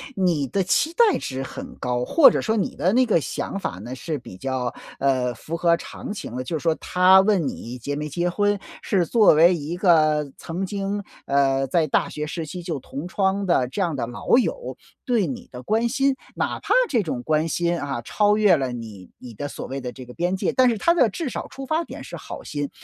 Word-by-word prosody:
你 170 -8 +1
的 190 +10 0
期 245 - +1
待 455 -2 +4
值 130 0 -4
很 125 - -8
高， 125 -1 -1
或 320 - +7
者 - - -1
说 220 - 0
你 200 - -1
的 185 - +1
那 255 +1 +4
个 215 -8 +3
想 200 - -4
法 - - -3
呢， 120 +6 -7
是 155 +3 -4
比 95 -6 -11
较 130 +1 -2 0.3
呃 130 -3 +1
符 155 +8 -6
合 170 -1 +3
常 205 - -8
情 125 - -7
的， 130 - -3
就 160 +5 -3
是 - - -9
说 165 -2 +2
他 185 +3 +5
问 195 -7 +2
你 120 +2 -6
结 140 +4 -4
没 150 +1 -4
结 175 +4 -1
婚 205 +2 +1 0.2
是 185 -4 +1
作 220 0 +5
为 170 +4 +6
一 160 +1 -4
个 155 -6 +3
曾 175 +4 -4
经 200 +1 -3 0.2
呃 135 -1 +2
在 160 +3 +2
大 - - +1
学 150 - -4
时 160 +1 -4
期 175 +4 -7
就 165 -4 -3
同 140 +5 -7
窗 195 +1 0
的 150 -8 +2
这 195 +10 -4
样 170 -5 0
的 130 - -2
老 120 - +1
友， - - -1 0.3
对 235 -6 +2
你 135 - -6
的 125 0 -9
关 225 - +1
心。 275 +2 +2 0.2
哪 - - -2
怕 - - 0 0.2
这 240 -6 +2
种 130 -9 -4
关 155 +3 +1
心 170 +1 0
啊， 140 -5 -3
超 210 - +2
越 205 -4 +5
了 130 -2 -2
你 110 -6 -8
你 120 -2 -11
的 145 +7 -5
所 - - -7
谓 135 +1 -4
的 125 - -5
这 130 0 -10
个 125 - -11
边 175 +5 -1
界， - - 0
但 255 -1 +5
是 230 - 0
他 340 +12 +3
的 250 -10 +4
至 300 - -4
少 - - -5
出 270 - -8
发 315 +5 0
点 - - -9
是 - - -8
好 - - -8
心， 145 -1 -4
170 Hz, 250 characters per minute, -23 LUFS, 135-200 Hz, 0.3 s, 或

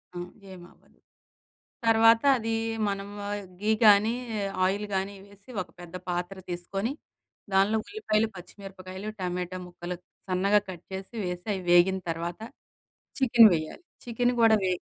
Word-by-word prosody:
అ! - - -5 0.3
ఏమి 180 -2 -11
అవ్వదు. - - -27 0.9
తర్వాత 225 0 +6 0.2
అది 225 0 -2 0.3
మనం 200 0 -3 0.5
ఘీ 215 - +1
గాని, 210 +2 +6 0.5
ఆయిల్ 200 +3 0
కానీ 195 +1 -1
వేసి, 200 +3 -18
ఒక - - -16
పెద్ద 175 0 -11
పాత్ర 180 +2 -2
తీసుకొని, 195 +7 -3 0.6
దాన్లో 195 +3 +4
ఉల్లిపాయలు, 225 - 0
పచ్చి 175 - -11
మిరపకాయలు, 190 +1 -7
టమాటా 180 0 -3
ముక్కలు 175 0 -6 0.3
సన్నగా 200 +3 +3
కట్ 180 -2 -8
చేసి, 190 +4 -7
వేసి, 180 0 -4
అవి 190 - -5
వేగిన 180 +2 +5
తర్వాత, 170 +3 -4 0.8
చికెన్ 235 -4 +7
వేయాలి. 155 - -4 0.2
చికెన్ 245 +1 +1
కూడా 225 -1 +6
వే 185 - +2
195 Hz, 135 wpm, -27 LUFS, 180-220 Hz, 0.9 s, చికెన్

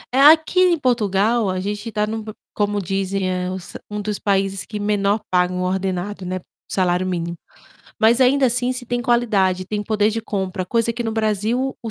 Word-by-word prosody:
Eh, - - +3
aqui, 320 +3 +2
em 360 -2 +5
Portugal, 225 -3 +1
a 185 0 -1
gente 205 +4 -4
tá 210 0 0
num 220 +1 -4
p 215 0 -8 0.2
como 205 -1 0
dizem 195 0 -1
é 180 0 -2
s 185 -2 -9
um 210 0 -4
dos 205 0 -3
países 195 -1 0
que 210 - -6
menor 205 0 +1
pagam 180 0 +1
ordenado, 190 +1 -2
né, 185 +1 -3 0.3
salário 180 -1 +1
mínimo. 170 -2 -3 0.7
Mas 230 +3 +5
ainda 265 +1 +4
assim 245 +1 +1
se 250 -1 -6
tem 245 0 -1
qualidade, 200 -6 +1
tem 210 +1 -2
poder 210 -1 +2
de 225 +1 -2
compra, 190 -3 -3
coisa 230 +4 +1
que 235 +1 -3
no 225 - -2
Brasil 220 +4 0
o 225 - -4
210 Hz, 190 wpm, -21 LUFS, 190-230 Hz, 0.7 s, em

